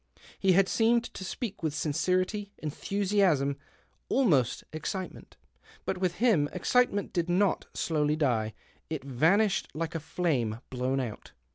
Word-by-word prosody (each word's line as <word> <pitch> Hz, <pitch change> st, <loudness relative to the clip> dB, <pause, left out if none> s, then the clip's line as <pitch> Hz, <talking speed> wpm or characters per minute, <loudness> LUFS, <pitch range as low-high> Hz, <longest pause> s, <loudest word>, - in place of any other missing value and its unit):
He 190 Hz, -1 st, +4 dB
had 190 Hz, +1 st, +4 dB
seemed 230 Hz, +2 st, +3 dB
to -, -, -7 dB
jpeak 205 Hz, +2 st, -5 dB
with 155 Hz, -3 st, -1 dB
sincerity, 185 Hz, +7 st, 0 dB
enthusiasm, 180 Hz, -3 st, +1 dB, 0.5 s
almost 155 Hz, -, +2 dB
ex 155 Hz, -, -3 dB
citement. 185 Hz, -, -7 dB, 0.5 s
But 185 Hz, -, -2 dB
with 180 Hz, -2 st, 0 dB
him 195 Hz, -10 st, +3 dB
excitement 205 Hz, +1 st, +1 dB
did 170 Hz, 0 st, 0 dB
not 185 Hz, +2 st, +2 dB
dowly 150 Hz, -2 st, +1 dB
die; 115 Hz, -8 st, 0 dB, 0.3 s
it 155 Hz, -4 st, -4 dB
vanished 175 Hz, -, +2 dB
like 165 Hz, +1 st, -3 dB
a 165 Hz, -, -2 dB
flame 145 Hz, -9 st, -1 dB
blown 130 Hz, +1 st, 0 dB
)ut. 120 Hz, -5 st, -6 dB
170 Hz, 135 wpm, -29 LUFS, 145-195 Hz, 0.5 s, He